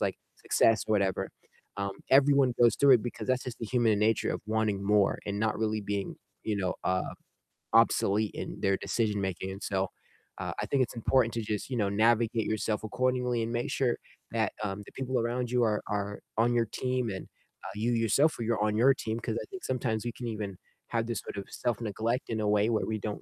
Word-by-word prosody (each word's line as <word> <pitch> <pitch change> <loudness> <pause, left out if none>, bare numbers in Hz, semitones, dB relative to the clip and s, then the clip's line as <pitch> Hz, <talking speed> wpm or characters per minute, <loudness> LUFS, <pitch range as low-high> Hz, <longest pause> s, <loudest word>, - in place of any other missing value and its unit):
like, - - 0 0.2
success 115 -1 +3
or 110 - +2
whatever, 100 -3 +1 0.5
um, 100 0 -1 0.2
everyone 135 -2 +5
goes 120 -1 +6
through 140 -1 +6
it 115 - +3
because 120 - -5
that's 130 0 +1
just 125 -2 -6
the 115 - -4
human 115 -3 +2
nature 110 +1 +2
of - - -4
wanting 110 -2 0
more, 105 0 +3
and 100 0 -2
not 110 -1 0
really 110 -1 0
being 100 -1 -3 0.3
you 105 -2 0
know, 95 -2 -1
uh, 95 0 0 0.6
obsolete 105 +1 +4
in - - -5
their 95 0 +3
decision 105 +1 0
making 95 0 -3
and 100 +2 -8
so, 95 -1 0 0.5
uh, - - -3
I - - -3
think 135 -2 +3
it's 120 - -5
important 115 0 +2
to 115 - -1
just, 105 +1 -3
you 130 - -2
know, 100 -3 +1
navigate 115 +2 +2
yourself 110 0 -1
accordingly, 125 +1 0
and 115 - -3
make 120 0 -1
sure 125 -3 +1 0.3
that, 110 -2 0
um, 100 0 -3
the - - -13
people 130 -1 -1
around 120 +1 -1
you 125 -1 +3
are 105 -2 +1
are 105 0 -3 0.2
on 120 +2 +3
your 120 -1 +3
team 125 +1 -1
and, 95 -2 -5 0.4
uh, - - -6
you 115 +3 0
yourself 120 +7 +3
yo 115 0 0
are 105 - 0
on 105 0 +1
your 130 +4 +6
team, 110 -1 -3
'cause 115 -1 -3
I - - -6
think 190 - -8
sometimes 120 -4 -1
we 120 - -1
can 120 - -6
even 105 -4 -4 0.3
have 115 -1 0
this 115 -3 -2
sort - - -8
of 100 - -4
self-neglect 115 +1 -2
in 110 - -1
a 105 - +1
way 105 +2 +3
where 110 - +1
we 110 -1 -2
don't 105 0 -4
110 Hz, 220 wpm, -29 LUFS, 105-120 Hz, 0.6 s, goes